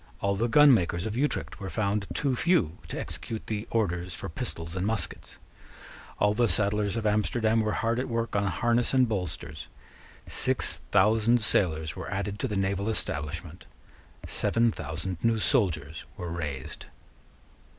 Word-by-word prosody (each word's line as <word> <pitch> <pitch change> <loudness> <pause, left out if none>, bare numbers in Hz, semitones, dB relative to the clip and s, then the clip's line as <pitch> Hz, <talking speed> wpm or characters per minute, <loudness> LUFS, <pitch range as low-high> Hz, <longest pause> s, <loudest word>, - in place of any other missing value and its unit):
All 100 0 +1
the 115 +4 0
gunmakers 115 - +5
of 110 -1 -3
Utrecht 145 +4 -1
were 95 -2 -5
found 100 -1 -1
too 135 -3 +1
few 120 - +2
to - - -5
execute 110 -1 -5
the 110 0 -3
orders 90 -5 -1
for - - -6
pistols 85 +1 -5
and 95 - -1
muskets. 100 -5 -3 0.8
All 105 0 +3
the 120 +1 +2
saddlers 105 0 +1
of 115 -1 -2
Amsterdam 110 +2 +2
were 110 0 0
hard 115 +1 0
at 130 - -2
work 115 -2 -2
on 100 0 +2
harness 120 +7 +1
and 130 -1 +5
bolsters. 90 -7 -4 0.6
Six - - 0
thousand 115 +2 +4
sailors 80 -6 +2
were - - -6
added 100 +1 -3
to - - -1
the 105 -4 -2
naval 100 +2 0
establishment. 80 -3 -4 0.6
Seven 115 0 +2
thousand 90 -1 -5
new 115 -1 +3
soldiers 85 - +1
were 90 -2 -5
raised. 75 -6 -5
105 Hz, 150 wpm, -28 LUFS, 90-115 Hz, 0.8 s, gunmakers